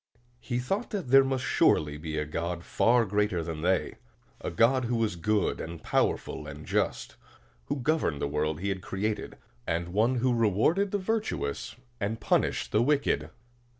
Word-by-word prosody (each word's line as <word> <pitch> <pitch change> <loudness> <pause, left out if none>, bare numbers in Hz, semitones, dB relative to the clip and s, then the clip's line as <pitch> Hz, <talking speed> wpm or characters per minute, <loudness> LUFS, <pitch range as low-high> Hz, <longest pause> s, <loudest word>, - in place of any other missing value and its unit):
He 120 -1 -3
thought 195 - -2
that 195 - -4
there 135 +1 +8
must 135 -1 -1
surely 75 -1 +3
be 80 0 -4
a 75 - -1
God 85 +3 -3
far 120 +5 +3
greater 105 -3 0
than 80 -1 -5
they, 95 +3 0 0.4
a - - -4
God 125 +2 +3
who 120 +1 0
was 110 -5 0
good 105 +3 0
and 85 0 -7
powerful - - 0
and - - -9
just, - - -1 0.5
who - - -2
governed 130 - 0
the - - -1
world 75 +2 -1
he 100 - -1
had 95 -1 -2
created, 105 +3 -3 0.3
and 85 +1 -1
who 120 +6 +2
rewarded 115 - +2
the 205 - 0
virtuous 205 - -2 0.2
and 110 +2 -2
punished - - +1
the 105 - +3
wicked. 145 +3 +1
105 Hz, 165 wpm, -28 LUFS, 85-130 Hz, 0.5 s, there